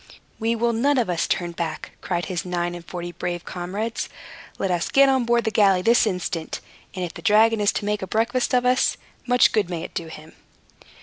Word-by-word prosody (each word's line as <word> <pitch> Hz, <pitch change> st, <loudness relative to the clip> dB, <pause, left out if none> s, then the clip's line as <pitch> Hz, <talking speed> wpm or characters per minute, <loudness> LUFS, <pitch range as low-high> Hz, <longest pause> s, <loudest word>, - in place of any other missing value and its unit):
"We 225 Hz, +1 st, +1 dB
will 235 Hz, +1 st, +1 dB
none 275 Hz, +5 st, +2 dB
of 230 Hz, -7 st, +1 dB
us 170 Hz, -, 0 dB
turn 175 Hz, -1 st, -1 dB
back!" 170 Hz, -1 st, -5 dB
cried 175 Hz, -1 st, -2 dB
his 180 Hz, -3 st, -3 dB
nine 175 Hz, -1 st, -2 dB
and 175 Hz, -1 st, -8 dB
forty 175 Hz, 0 st, -6 dB
brave 175 Hz, 0 st, -4 dB
comrades. 200 Hz, +6 st, -4 dB, 0.5 s
"Let 190 Hz, -, -1 dB
us 175 Hz, -1 st, 0 dB
get 275 Hz, 0 st, +5 dB
on 260 Hz, -2 st, +2 dB
board 235 Hz, 0 st, +2 dB
the 220 Hz, -, -1 dB
galley 195 Hz, -4 st, +4 dB
this 230 Hz, +1 st, +4 dB
instant; 180 Hz, -4 st, -3 dB, 0.4 s
and 185 Hz, -1 st, -2 dB
if 170 Hz, -, -8 dB
the -, -, -10 dB
dragon 225 Hz, 0 st, +4 dB
is 205 Hz, -, +3 dB
to 205 Hz, -, -3 dB
make 210 Hz, 0 st, -1 dB
a 190 Hz, -, -4 dB
breakfast 240 Hz, +4 st, +1 dB
of 250 Hz, 0 st, +2 dB
us, 255 Hz, +1 st, +2 dB, 0.3 s
much 245 Hz, 0 st, +5 dB
good 210 Hz, -5 st, +1 dB
may 170 Hz, -2 st, -4 dB
it -, -, -8 dB
do 165 Hz, -, -4 dB
him." 155 Hz, 0 st, -11 dB
200 Hz, 220 wpm, -23 LUFS, 175-230 Hz, 0.5 s, get